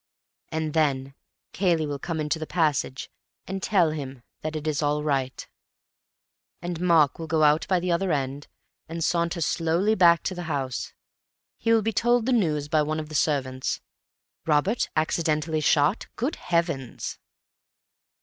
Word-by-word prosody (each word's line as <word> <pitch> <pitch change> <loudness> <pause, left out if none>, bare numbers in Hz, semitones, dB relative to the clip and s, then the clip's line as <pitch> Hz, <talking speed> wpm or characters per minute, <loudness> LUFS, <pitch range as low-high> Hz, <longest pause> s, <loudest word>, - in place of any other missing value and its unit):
And 160 -1 -2
then 135 -4 +1 0.4
Cayley 170 -5 +2
will 145 -1 -4
come 165 +1 -3
into 150 +1 -1
the 155 - -5
passage 150 -6 0 0.3
and 190 +1 -4
tell 180 -7 +3
him 135 -5 -6 0.2
that 155 0 -4
it 155 -1 -4
is 155 -1 0
all 150 0 0
right, 135 -3 -1 1.1
and 175 -1 -5
Mark 165 -6 +4
will 165 - -5
go 160 0 +2
out 150 +2 +4
by 185 -2 +2
the 180 0 -1
other 180 +2 +1
end, 140 0 -2 0.4
and 165 0 -3
saunter 170 +1 0
slowly 170 +6 +1
back 170 -5 +5
to - - -2
the 175 -1 -6
house. 135 -4 -2 0.7
He 230 - +1
will 225 -1 +4
be 225 +1 0
told 240 0 +2
the 260 - +2
news 155 -10 +1
by 155 0 +2
one 155 +1 -1
of 155 -1 -6
the - - -9
servants. 130 -4 0 0.7
Robert 160 +9 +2
accidentally 155 0 0
shot? 150 +5 +2
Good 265 +7 -2
Heavens! 170 -8 -2
155 Hz, 160 wpm, -26 LUFS, 145-175 Hz, 1.1 s, back